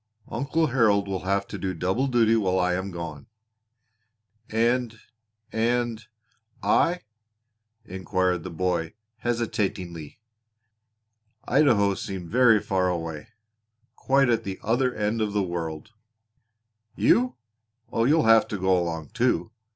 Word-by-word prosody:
"Uncle 140 Hz, +7 st, 0 dB
Harold 110 Hz, -7 st, +2 dB
will 95 Hz, -2 st, -4 dB
have 100 Hz, +1 st, 0 dB
to -, -, -7 dB
do 95 Hz, -2 st, -3 dB
double 95 Hz, +11 st, 0 dB
duty 115 Hz, -3 st, +3 dB
while 95 Hz, -4 st, +1 dB
I 90 Hz, -1 st, +1 dB
am 95 Hz, +2 st, -2 dB
gone." 85 Hz, -5 st, -7 dB, 1.2 s
"And 115 Hz, 0 st, 0 dB, 0.5 s
and 115 Hz, 0 st, 0 dB, 0.6 s
I?" 175 Hz, +1 st, +2 dB, 0.8 s
inquired 95 Hz, -2 st, -1 dB
the 95 Hz, -, -6 dB
boy 85 Hz, +1 st, -2 dB, 0.2 s
hesitatingly. 105 Hz, -9 st, -3 dB, 1.3 s
Idaho 120 Hz, -8 st, +3 dB
seemed 95 Hz, -5 st, -6 dB
very 120 Hz, -2 st, +5 dB
far 95 Hz, -2 st, 0 dB
away 80 Hz, -3 st, -4 dB, 0.7 s
quite 135 Hz, -2 st, +2 dB
at 115 Hz, -1 st, +1 dB
the 95 Hz, -2 st, -5 dB
other 125 Hz, +4 st, +1 dB
end 110 Hz, 0 st, -1 dB
of 105 Hz, -2 st, -1 dB
the 105 Hz, -1 st, +1 dB
world. 85 Hz, 0 st, -5 dB, 1.0 s
"You? 250 Hz, +1 st, +3 dB, 0.6 s
Oh, 115 Hz, -, +1 dB
you'll 155 Hz, +4 st, +4 dB
have 115 Hz, 0 st, +5 dB
to 105 Hz, -, -4 dB
go 95 Hz, 0 st, +2 dB
along 85 Hz, -3 st, -2 dB
too! 120 Hz, -2 st, 0 dB
105 Hz, 120 wpm, -25 LUFS, 90-120 Hz, 1.3 s, very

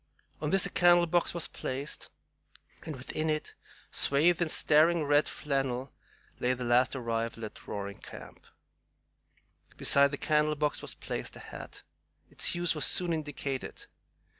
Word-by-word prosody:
On 150 Hz, -, -1 dB
this 195 Hz, +3 st, +4 dB
a -, -, -4 dB
candle 175 Hz, -1 st, +5 dB
box 170 Hz, +1 st, +1 dB
was 170 Hz, -2 st, -3 dB
placed, 135 Hz, +3 st, -5 dB, 0.8 s
and 155 Hz, -, -4 dB
within 155 Hz, +4 st, -3 dB
it, 155 Hz, 0 st, -2 dB, 0.4 s
swathed 160 Hz, +5 st, +3 dB
in 170 Hz, -, +1 dB
staring 155 Hz, +2 st, +4 dB
red 145 Hz, +1 st, +3 dB
flannel, 135 Hz, -2 st, -2 dB, 0.5 s
lay 125 Hz, +1 st, +1 dB
the 125 Hz, 0 st, -5 dB
last 120 Hz, +3 st, +3 dB
arrival 115 Hz, -2 st, -3 dB
at 105 Hz, -, -12 dB
Roaring 100 Hz, -1 st, -5 dB
Camp. -, -, -12 dB, 1.3 s
Beside 140 Hz, 0 st, +5 dB
the 145 Hz, -, -4 dB
candle 150 Hz, 0 st, +1 dB
box 150 Hz, 0 st, -1 dB
was -, -, -7 dB
placed -, -, -5 dB
a -, -, -10 dB
hat. -, -, -10 dB, 0.5 s
Its -, -, +2 dB
use 175 Hz, 0 st, +1 dB
was 150 Hz, -3 st, +2 dB
soon 175 Hz, -2 st, +1 dB
indicated. 145 Hz, -4 st, -5 dB
150 Hz, 145 wpm, -30 LUFS, 130-160 Hz, 1.3 s, candle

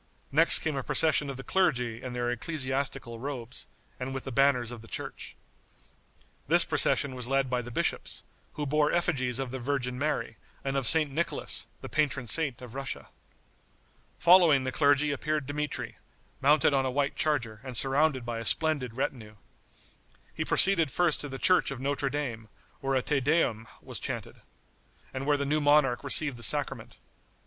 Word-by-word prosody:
Next 160 Hz, +4 st, +5 dB
came 160 Hz, -2 st, -2 dB
a 135 Hz, -, -2 dB
procession 155 Hz, -1 st, +3 dB
of 135 Hz, -, -6 dB
the 135 Hz, -, -7 dB
clergy 125 Hz, -12 st, 0 dB
in 130 Hz, -1 st, -6 dB
their 120 Hz, 0 st, -2 dB
ecclesiastical 130 Hz, -3 st, -3 dB
robes, 130 Hz, -2 st, -6 dB, 0.3 s
and 130 Hz, +1 st, -5 dB
with 135 Hz, -, -5 dB
the 135 Hz, -, -6 dB
banners 125 Hz, -2 st, +2 dB
of 120 Hz, -2 st, -9 dB
the 115 Hz, -, -14 dB
church. -, -, -7 dB, 1.1 s
This -, -, +7 dB
procession 140 Hz, -2 st, +2 dB
was 125 Hz, -2 st, -5 dB
led 135 Hz, -1 st, 0 dB
by 125 Hz, -1 st, 0 dB
the 120 Hz, -, -9 dB
bishops, 120 Hz, -, -1 dB, 0.3 s
who 150 Hz, -, -4 dB
bore 150 Hz, +1 st, +1 dB
effigies 135 Hz, -8 st, 0 dB
of 135 Hz, -2 st, -3 dB
the 130 Hz, -, -5 dB
Virgin 125 Hz, -1 st, -2 dB
Mary 145 Hz, -6 st, -2 dB, 0.3 s
and 135 Hz, 0 st, -3 dB
of 135 Hz, -3 st, +1 dB
St. 155 Hz, -1 st, +4 dB
Nicholas, 165 Hz, +5 st, -2 dB
the -, -, -7 dB
patron 140 Hz, -4 st, -1 dB
saint 135 Hz, -1 st, +1 dB
of 120 Hz, -2 st, -10 dB
Russia. 135 Hz, 0 st, -6 dB, 1.1 s
Following 170 Hz, -6 st, +5 dB
the 130 Hz, -, -2 dB
clergy 145 Hz, +1 st, +2 dB
appeared 150 Hz, +1 st, -2 dB
Dmitri, 150 Hz, +2 st, -4 dB, 0.4 s
mounted 145 Hz, +1 st, +4 dB
on 135 Hz, -1 st, +2 dB
a 130 Hz, -, -1 dB
white 140 Hz, +2 st, -1 dB
charger, 120 Hz, -8 st, -1 dB
and 130 Hz, -3 st, -4 dB
surrounded 135 Hz, -1 st, +2 dB
by 120 Hz, -1 st, -4 dB
a -, -, -5 dB
splendid 140 Hz, -3 st, +2 dB
retinue. 115 Hz, -5 st, -4 dB, 1.0 s
He -, -, -3 dB
proceeded 180 Hz, -6 st, +3 dB
first 170 Hz, +3 st, 0 dB
to 145 Hz, -, -6 dB
the 135 Hz, -, -6 dB
church 185 Hz, +7 st, +3 dB
of 135 Hz, -2 st, -6 dB
Notre 140 Hz, +1 st, -1 dB
Dame, 125 Hz, -6 st, -4 dB, 0.3 s
where 135 Hz, 0 st, -1 dB
a 130 Hz, -, +1 dB
Te 145 Hz, -2 st, 0 dB
Deum 130 Hz, -6 st, 0 dB, 0.2 s
was -, -, -7 dB
chanted, -, -, -5 dB, 0.8 s
and 135 Hz, +1 st, -5 dB
where 145 Hz, -1 st, +3 dB
the 140 Hz, -, -2 dB
new 150 Hz, +2 st, 0 dB
monarch 145 Hz, -4 st, +3 dB
received 140 Hz, -1 st, +2 dB
the -, -, -7 dB
sacrament. 115 Hz, -, +2 dB
135 Hz, 175 wpm, -28 LUFS, 125-150 Hz, 1.1 s, This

